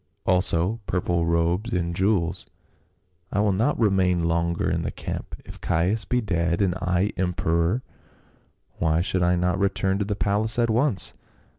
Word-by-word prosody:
also 90 Hz, +3 st, +2 dB
purple 85 Hz, -2 st, 0 dB
robes 85 Hz, +7 st, 0 dB
and 85 Hz, -1 st, -1 dB
jewels; 95 Hz, -3 st, 0 dB, 0.8 s
I 100 Hz, -, 0 dB
will 105 Hz, 0 st, +3 dB
not 110 Hz, +10 st, 0 dB
remain 95 Hz, -5 st, +2 dB
longer 85 Hz, 0 st, 0 dB
in -, -, 0 dB
the -, -, -2 dB
camp; -, -, -6 dB
if -, -, -11 dB
Caius 90 Hz, +7 st, 0 dB
be 125 Hz, 0 st, 0 dB
dead 85 Hz, -5 st, 0 dB
and 95 Hz, -3 st, +2 dB
I 90 Hz, +2 st, 0 dB
emperor, 90 Hz, +4 st, 0 dB, 1.0 s
why 80 Hz, +1 st, +2 dB
should 95 Hz, 0 st, -1 dB
I 90 Hz, 0 st, +3 dB
not 90 Hz, +2 st, 0 dB
return 95 Hz, 0 st, 0 dB
to 105 Hz, -, 0 dB
the 105 Hz, 0 st, -2 dB
palace 105 Hz, +2 st, +2 dB
at 115 Hz, -1 st, +2 dB
once 120 Hz, -2 st, +1 dB
90 Hz, 155 wpm, -24 LUFS, 85-105 Hz, 1.0 s, will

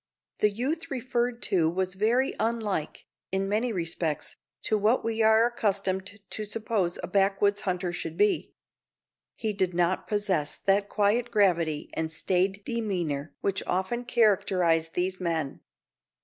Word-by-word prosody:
The 210 Hz, -, +4 dB
youth 265 Hz, +10 st, -3 dB
referred 245 Hz, -2 st, -1 dB
to 175 Hz, -6 st, +2 dB
was 185 Hz, +2 st, -1 dB
very 230 Hz, +7 st, +2 dB
unlike, 220 Hz, -8 st, -2 dB, 0.3 s
in 190 Hz, +1 st, 0 dB
many 220 Hz, +5 st, 0 dB
respects, 165 Hz, -4 st, -2 dB, 0.3 s
to 220 Hz, -, +1 dB
what 215 Hz, +4 st, +2 dB
we 225 Hz, 0 st, 0 dB
are 220 Hz, +1 st, +6 dB
accustomed 200 Hz, -3 st, -1 dB
to 215 Hz, -, -2 dB
suppose 210 Hz, -4 st, -1 dB
a -, -, -3 dB
backwoods 200 Hz, +1 st, +2 dB
hunter 180 Hz, -1 st, -1 dB
should 165 Hz, -1 st, -4 dB
be. 205 Hz, +1 st, +1 dB, 0.8 s
He 220 Hz, -2 st, -2 dB
did 185 Hz, -3 st, -1 dB
not 175 Hz, +1 st, +1 dB
possess 195 Hz, -8 st, 0 dB
that 200 Hz, +1 st, +1 dB
quiet 220 Hz, +4 st, +2 dB
gravity 170 Hz, -8 st, +1 dB
and 160 Hz, 0 st, -2 dB
staid 190 Hz, +5 st, 0 dB
demeanour 175 Hz, -11 st, -2 dB
which 195 Hz, -1 st, 0 dB
often 190 Hz, +7 st, -1 dB
characterize 185 Hz, -8 st, +3 dB
these 185 Hz, +2 st, -2 dB
men. 165 Hz, -6 st, -2 dB
200 Hz, 135 wpm, -27 LUFS, 180-220 Hz, 0.8 s, are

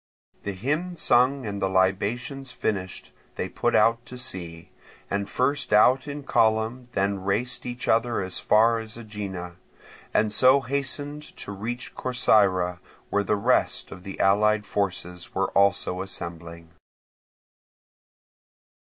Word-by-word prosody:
The 100 Hz, -, -4 dB
hymn 150 Hz, -, -2 dB
sung 130 Hz, -2 st, +3 dB
and 100 Hz, -1 st, -4 dB
the 95 Hz, -, +1 dB
libations 105 Hz, +8 st, 0 dB
finished, 95 Hz, -4 st, -3 dB, 0.2 s
they -, -, -2 dB
put -, -, 0 dB
out 115 Hz, +1 st, +4 dB
to 125 Hz, -, -8 dB
sea, 90 Hz, -8 st, -6 dB, 0.4 s
and 100 Hz, 0 st, -1 dB
first 140 Hz, +4 st, 0 dB
out 125 Hz, +6 st, +5 dB
in 145 Hz, 0 st, -6 dB
column 110 Hz, +1 st, +1 dB
then 100 Hz, 0 st, 0 dB
raced 105 Hz, +7 st, -1 dB
each 120 Hz, 0 st, -5 dB
other 115 Hz, +1 st, +2 dB
as 95 Hz, -1 st, -3 dB
far 115 Hz, +2 st, +4 dB
as 110 Hz, 0 st, -6 dB
Aegina, 100 Hz, -6 st, -6 dB, 0.5 s
and 105 Hz, -1 st, +2 dB
so 130 Hz, +5 st, +6 dB
hastened 140 Hz, +2 st, -2 dB, 0.2 s
to -, -, -7 dB
reach 115 Hz, +5 st, -5 dB
Corcyra, 95 Hz, -8 st, +2 dB, 0.3 s
where 100 Hz, 0 st, +2 dB
the 105 Hz, -, +1 dB
rest 120 Hz, +5 st, +1 dB
of 95 Hz, -, -9 dB
the 95 Hz, +1 st, -8 dB
allied 105 Hz, +2 st, +3 dB
forces 90 Hz, -3 st, -3 dB
were -, -, 0 dB
also 100 Hz, -2 st, +2 dB
assembling. 85 Hz, -3 st, -7 dB
105 Hz, 130 wpm, -25 LUFS, 95-125 Hz, 0.5 s, so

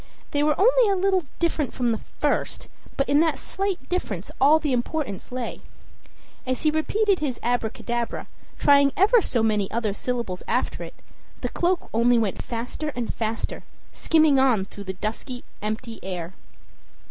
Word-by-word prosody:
They 290 Hz, -, +1 dB
were 300 Hz, 0 st, +2 dB
only 485 Hz, +2 st, +5 dB
a 395 Hz, -, +3 dB
little 380 Hz, -2 st, +2 dB
different 325 Hz, -5 st, 0 dB
from 245 Hz, -2 st, +1 dB
the 220 Hz, -, -1 dB
first, -, -, -2 dB, 0.3 s
but 275 Hz, -, +1 dB
in 285 Hz, +1 st, +4 dB
that 320 Hz, -3 st, +2 dB
slight 390 Hz, -1 st, -3 dB
difference 210 Hz, -, -3 dB
all 290 Hz, +4 st, +7 dB
the 300 Hz, -4 st, -1 dB
importance 245 Hz, -4 st, -2 dB
lay. 250 Hz, -1 st, -4 dB, 0.8 s
As 255 Hz, -1 st, -2 dB
he 305 Hz, -, +4 dB
repeated 395 Hz, +6 st, +1 dB
his 275 Hz, -5 st, -2 dB
"Abracadabra," 235 Hz, 0 st, -1 dB, 0.3 s
trying 280 Hz, -1 st, +5 dB
ever 435 Hz, +5 st, +6 dB
so 235 Hz, -, 0 dB
many 210 Hz, -3 st, +1 dB
other 220 Hz, -3 st, -1 dB
syllables 235 Hz, -4 st, -3 dB
after -, -, -1 dB
it, -, -, -9 dB, 0.5 s
the -, -, -1 dB
cloak 355 Hz, +1 st, 0 dB
only 235 Hz, +2 st, +4 dB
went 215 Hz, -4 st, 0 dB
faster 240 Hz, +6 st, -4 dB
and 240 Hz, -2 st, -2 dB
faster, 225 Hz, 0 st, -3 dB, 0.3 s
skimming 310 Hz, -4 st, +4 dB
on 245 Hz, -8 st, +3 dB
through 200 Hz, 0 st, -10 dB
the 190 Hz, -, -3 dB
dusky, 225 Hz, +6 st, -5 dB, 0.2 s
empty 225 Hz, +2 st, -4 dB
air. 180 Hz, -2 st, -5 dB
255 Hz, 160 wpm, -25 LUFS, 225-315 Hz, 0.8 s, all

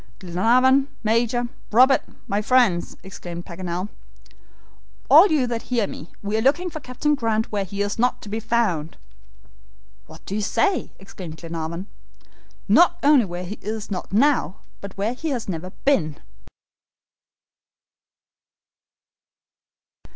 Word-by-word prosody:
"Glenarvan, 245 Hz, +9 st, +3 dB, 0.2 s
Major, 235 Hz, +2 st, +1 dB, 0.2 s
Robert, 255 Hz, +4 st, +6 dB, 0.3 s
my 200 Hz, +1 st, 0 dB
friends," 215 Hz, -7 st, +2 dB
exclaimed 175 Hz, -2 st, -8 dB
Paganel, 180 Hz, +1 st, -4 dB, 1.2 s
"all -, -, +9 dB
you 305 Hz, -8 st, +2 dB
that 235 Hz, -2 st, -3 dB
hear 240 Hz, -4 st, 0 dB
me, 165 Hz, -3 st, -9 dB
we 205 Hz, +1 st, -2 dB
are 220 Hz, -, +1 dB
looking 340 Hz, +8 st, +2 dB
for 310 Hz, -, -6 dB
Captain 285 Hz, +2 st, -1 dB
Grant 225 Hz, -5 st, -1 dB
where 205 Hz, -2 st, 0 dB
he 200 Hz, +2 st, -3 dB
is 205 Hz, +2 st, -4 dB
not 250 Hz, +2 st, +1 dB
to -, -, -10 dB
be 220 Hz, +2 st, -2 dB
found." 200 Hz, -9 st, -1 dB, 1.1 s
"What -, -, -14 dB
do -, -, -6 dB
you 215 Hz, -, -1 dB
say?" 360 Hz, -, 0 dB
exclaimed 180 Hz, -4 st, -10 dB
Glenarvan. 165 Hz, +2 st, -5 dB, 0.8 s
"Not 345 Hz, 0 st, +5 dB
only 285 Hz, -5 st, +5 dB
where 175 Hz, 0 st, -6 dB
he 205 Hz, +4 st, -7 dB
is 215 Hz, 0 st, -5 dB
not 180 Hz, -, -4 dB
now, 220 Hz, -, +2 dB, 0.2 s
but 200 Hz, -1 st, -9 dB
where 210 Hz, +4 st, -1 dB
he 315 Hz, +5 st, -4 dB
has 245 Hz, -6 st, -3 dB
never 180 Hz, -1 st, -4 dB, 0.2 s
been." 170 Hz, -, +2 dB
215 Hz, 130 wpm, -23 LUFS, 185-255 Hz, 1.2 s, all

